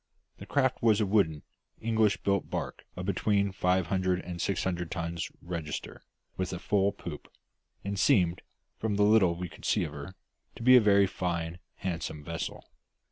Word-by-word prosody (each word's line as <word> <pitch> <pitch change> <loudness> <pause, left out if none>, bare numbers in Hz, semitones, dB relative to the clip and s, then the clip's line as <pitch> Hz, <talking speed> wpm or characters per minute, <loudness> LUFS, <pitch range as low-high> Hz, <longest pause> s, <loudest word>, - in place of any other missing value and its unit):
The - - -9
craft 130 -3 +1
was 110 -3 +4
a 105 - +2
wooden, 95 -7 +2 0.4
English 110 -2 +1
built 100 -1 +1
barque - - -4
of 90 - -5
between 100 +1 +1
five 90 -1 +1
hundred 95 0 +1
and 85 -1 -6
six 100 -3 0
hundred 90 -2 -2
tons 85 -1 -3
register, 85 -4 -5 0.4
with 95 -1 -2
a 90 - -3
full 100 +2 +2
poop; 85 -7 -9 0.5
and 100 0 -3
seemed, 90 -10 +3 0.4
from 110 -2 -1
the 105 - +3
little 105 -5 +5
we 90 +1 -4
could 80 - -15
see - - +2
of 75 - -5
her, 75 +6 -8 0.4
to - - -8
be 130 +1 +8
a 125 - +8
very 100 -2 +5
fine, 85 -3 -3 0.2
handsome 80 -4 -4
vessel. 85 +2 -5
95 Hz, 175 wpm, -29 LUFS, 85-100 Hz, 0.5 s, be